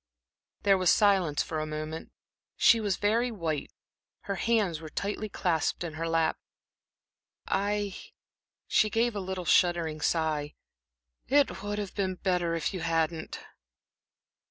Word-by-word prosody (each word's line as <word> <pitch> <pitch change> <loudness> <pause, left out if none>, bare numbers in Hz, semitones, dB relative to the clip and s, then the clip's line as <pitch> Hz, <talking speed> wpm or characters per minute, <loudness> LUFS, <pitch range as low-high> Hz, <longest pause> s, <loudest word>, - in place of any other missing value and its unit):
There 195 -2 +4
was 185 - +3
silence 190 -8 +3
for 155 - -4
a 155 - -3
moment. 155 +1 -5 0.5
She 230 - +6
was 205 -4 0
very 225 +4 +2
white, 165 -9 -3 0.5
her 200 - -3
hands 205 -7 +1
were 160 - -8
tightly 205 +5 -3
clasped 175 -4 0
in 165 -2 -5
her 165 +1 -3
lap. 165 -1 +1 1.1
"I" 205 0 0 0.7
she 215 - +3
gave 230 +1 +1
a - - -1
little 185 -1 -4
shuddering 170 -3 +2
sigh 155 -3 0 0.7
"it 285 +2 +2
would 205 +1 -3
have 205 -2 -4
been 190 -2 -1
better 180 -3 0
if 165 +4 -2
you 185 - -3
hadn't." 165 -1 -1
180 Hz, 135 wpm, -29 LUFS, 160-205 Hz, 1.1 s, She